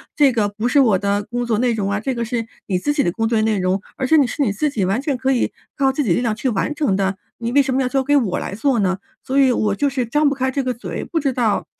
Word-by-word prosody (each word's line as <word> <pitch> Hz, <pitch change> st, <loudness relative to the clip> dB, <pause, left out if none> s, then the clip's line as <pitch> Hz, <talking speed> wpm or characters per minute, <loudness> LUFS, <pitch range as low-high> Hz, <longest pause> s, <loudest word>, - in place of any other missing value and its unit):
这 285 Hz, -3 st, +5 dB
个 220 Hz, -4 st, +1 dB
不 215 Hz, +3 st, -3 dB
是 265 Hz, +4 st, +3 dB
我 225 Hz, -8 st, +4 dB
的 200 Hz, +1 st, 0 dB
工 245 Hz, +4 st, -3 dB
作 230 Hz, -2 st, 0 dB
内 245 Hz, -1 st, +2 dB
容 205 Hz, -3 st, -1 dB
啊， 200 Hz, -, 0 dB
这 260 Hz, +6 st, -2 dB
个 235 Hz, -, -2 dB
是 235 Hz, -1 st, -2 dB, 0.2 s
你 190 Hz, -, 0 dB
自 290 Hz, +10 st, 0 dB
己 290 Hz, -, +1 dB
的 175 Hz, -, +1 dB
工 225 Hz, +5 st, -1 dB
作 225 Hz, -1 st, +1 dB
内 215 Hz, -1 st, +1 dB
容， 185 Hz, +1 st, 0 dB, 0.2 s
而 265 Hz, -, -1 dB
且 320 Hz, -, +4 dB
你 285 Hz, -, +5 dB
是 295 Hz, -, -4 dB
你 245 Hz, -7 st, +2 dB
自 295 Hz, +10 st, 0 dB
己 220 Hz, -9 st, -1 dB
完 195 Hz, +7 st, 0 dB
全 280 Hz, -1 st, -1 dB
可 260 Hz, +1 st, 0 dB
以 255 Hz, -, +1 dB, 0.3 s
靠 270 Hz, -2 st, +3 dB
自 290 Hz, +2 st, -1 dB
己 200 Hz, -9 st, +2 dB
力 240 Hz, -, 0 dB
量 230 Hz, -3 st, 0 dB
去 260 Hz, -, -1 dB
完 230 Hz, +6 st, -1 dB
成 290 Hz, -10 st, +1 dB
的， 195 Hz, 0 st, 0 dB, 0.2 s
你 230 Hz, 0 st, -3 dB
为 285 Hz, +3 st, +5 dB
什 265 Hz, -1 st, -1 dB
么 265 Hz, -, +1 dB
要 255 Hz, -, +1 dB
交 265 Hz, +1 st, 0 dB
给 290 Hz, +2 st, +2 dB
我 230 Hz, -10 st, +1 dB
来 -, -, -5 dB
做 250 Hz, +2 st, +1 dB
呢？ 190 Hz, -2 st, +1 dB, 0.3 s
所 265 Hz, -, -2 dB
以 265 Hz, -2 st, +5 dB
我 210 Hz, -4 st, 0 dB
就 285 Hz, +6 st, +1 dB
是 260 Hz, -2 st, -1 dB
张 295 Hz, +6 st, +2 dB
不 280 Hz, -, -2 dB
开 260 Hz, 0 st, -1 dB
这 275 Hz, +1 st, -1 dB
个 255 Hz, -1 st, -1 dB
嘴， 235 Hz, -, -6 dB
不 330 Hz, -, -2 dB
知 280 Hz, -3 st, 0 dB
道 230 Hz, -5 st, 0 dB
245 Hz, 340 characters per minute, -20 LUFS, 210-270 Hz, 0.3 s, 这